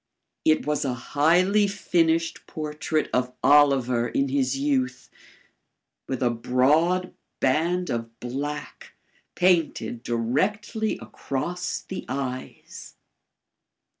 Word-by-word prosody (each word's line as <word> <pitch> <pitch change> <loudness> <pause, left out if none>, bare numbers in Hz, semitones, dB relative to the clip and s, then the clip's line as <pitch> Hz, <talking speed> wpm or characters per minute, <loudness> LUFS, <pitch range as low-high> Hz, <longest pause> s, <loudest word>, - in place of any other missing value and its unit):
IT 155 - +3
WAS 150 0 0
A 130 -3 -1
HIGHLY 175 - +3
FINISHED 165 -4 0
PORTRAIT 155 0 -2
OF 125 0 0
OLIVER 130 -4 +4
IN 135 +3 0
HIS 135 -1 0
YOUTH, 130 -2 -1 1.0
WITH 130 -1 -2
A 120 - +3
BROAD 150 +10 +2 0.3
BAND 170 +7 +1
OF 115 -1 -5
BLACK 140 +5 -5 0.4
PAINTED 160 -10 +1
DIRECTLY 190 - -1
ACROSS 175 +7 -4
THE 190 - -7
EYES. 130 -1 -6
145 Hz, 95 wpm, -25 LUFS, 125-170 Hz, 1.0 s, OLIVER